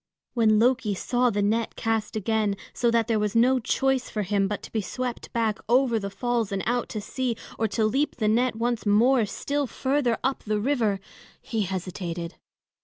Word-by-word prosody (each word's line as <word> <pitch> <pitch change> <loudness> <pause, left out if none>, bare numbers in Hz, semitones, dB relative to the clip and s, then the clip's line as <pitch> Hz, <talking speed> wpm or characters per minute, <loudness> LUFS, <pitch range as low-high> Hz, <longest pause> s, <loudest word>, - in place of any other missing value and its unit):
When 220 -3 +4
Loki 235 -2 +2
saw 245 +5 +1
the 205 -2 0
net 220 +2 0
cast 225 -1 -1
again, 215 -1 0 0.2
so 240 - +1
that 230 -1 +2
there 225 -2 +1
was 210 0 -1
no 255 +3 +4
choice 265 +2 0
for 210 - -2
him 195 0 +1
but 205 +1 -4
to - - -10
be 220 - 0
swept 250 +4 -5
back 225 -3 0
over 245 -2 +3
the 200 -1 -4
falls 235 0 -1
and 195 -2 -2
out 240 +1 0
to 215 - -4
sea, 250 +2 -2 0.2
or 225 - +2
to 220 +1 0
leap 275 +7 +1
the 215 -3 0
net 240 +3 +2
once 235 +1 -1
more 225 +3 +4
still 285 +6 -2
further 260 -2 0
up 265 +1 0
the 210 0 -1
river, 220 -5 +1 0.4
he 225 - -3
hesitated. 180 -2 -4
225 Hz, 190 wpm, -26 LUFS, 210-245 Hz, 0.4 s, When